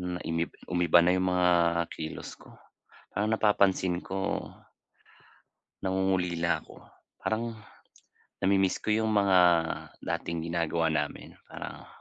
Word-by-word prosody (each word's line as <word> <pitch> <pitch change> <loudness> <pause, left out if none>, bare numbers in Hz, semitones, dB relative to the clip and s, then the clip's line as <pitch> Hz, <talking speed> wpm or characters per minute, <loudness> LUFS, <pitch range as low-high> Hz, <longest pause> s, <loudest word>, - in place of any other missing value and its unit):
na 90 0 -3
imi 85 +1 -1 0.2
umiba 85 -1 +4
na 90 - +4
yung 95 0 +1
mga 90 0 +3 0.4
kilos 80 0 -6
ko. - - -16 0.7
Parang 105 +2 0
napapansin 95 -4 +2
ko 95 +1 -2 1.4
nangungulila 90 -3 0
ako. - - -16 0.4
Parang 115 +1 -2 0.9
namimiss 95 -1 +2
ko 110 - -2
yung 110 0 +1
mga 100 -2 +4 0.6
dating 85 0 -3
ginagawa 85 -1 0
namin. 80 - -3 0.2
Parang - - -8
90 Hz, 110 wpm, -29 LUFS, 85-95 Hz, 1.4 s, umiba